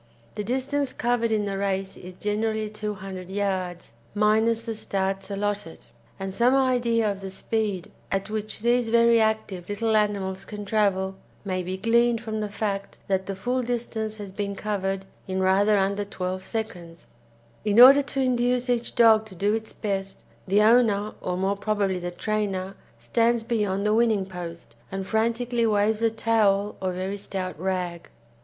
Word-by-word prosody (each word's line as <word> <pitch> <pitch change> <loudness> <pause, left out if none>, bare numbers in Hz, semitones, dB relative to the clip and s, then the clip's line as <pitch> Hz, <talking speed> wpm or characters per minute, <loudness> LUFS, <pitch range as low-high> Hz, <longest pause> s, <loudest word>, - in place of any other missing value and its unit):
The 210 - -4
distance 265 +4 -1
covered 240 -1 0
in 210 -1 +1
the 195 -1 -3
race 195 -1 -1
is 180 0 -10
generally 215 +1 -1
200 195 -4 -6
yards, 190 - -2 0.2
minus 220 +2 +3
the 230 -1 -3
starts 195 -2 -2
allotted, 200 -4 -3 0.3
and 195 0 -4
some 240 +5 +3
idea 240 -5 +2
of 200 0 -7
the 195 - -5
speed 205 -2 -2 0.2
at 195 0 -1
which 215 0 -4
these 240 0 +2
very 235 0 +5
active 220 -5 -1
little 220 +2 0
animals 195 -3 0
can 205 0 -7
travel 190 -2 +1 0.3
may 185 -2 -1
be 185 +1 -4
gleaned 235 +3 +3
from 220 -2 -4
the 210 -1 -2
fact 200 -1 -3
that 190 -1 0
the 195 - -3
full 245 +6 -1
distance 230 -3 -3
has 205 -2 -7
been 200 0 -3
covered 195 -2 -2 0.2
in 190 0 -2
rather 195 +3 +4
under 200 +1 +1
12 185 -2 -4
seconds. 180 -5 -6 0.6
In 210 +1 +3
order 270 +3 +10
to 275 -1 -3
induce 250 0 +1
each 240 -1 -1
dog 220 -2 +5
to 190 - -12
do 205 +4 +1
its 220 0 -3
best, 195 -2 -4 0.2
the 200 +3 +4
owner, 215 -2 +4
or 180 0 -2
more 195 +2 +1
probably 200 -2 0
the 175 0 -4
trainer 195 0 -2 0.2
stands 235 0 +1
beyond 210 -4 -1
the 210 - +3
winning 220 -4 +3
post, 170 -8 -8 0.2
and 195 0 -3
frantically 230 +2 +1
waves 210 +1 +2
a 230 - +4
towel 215 -3 +2
or 185 -1 0
very 185 +2 -3
stout 190 -2 -4
rag. 180 -2 -3
205 Hz, 165 wpm, -25 LUFS, 190-225 Hz, 0.6 s, order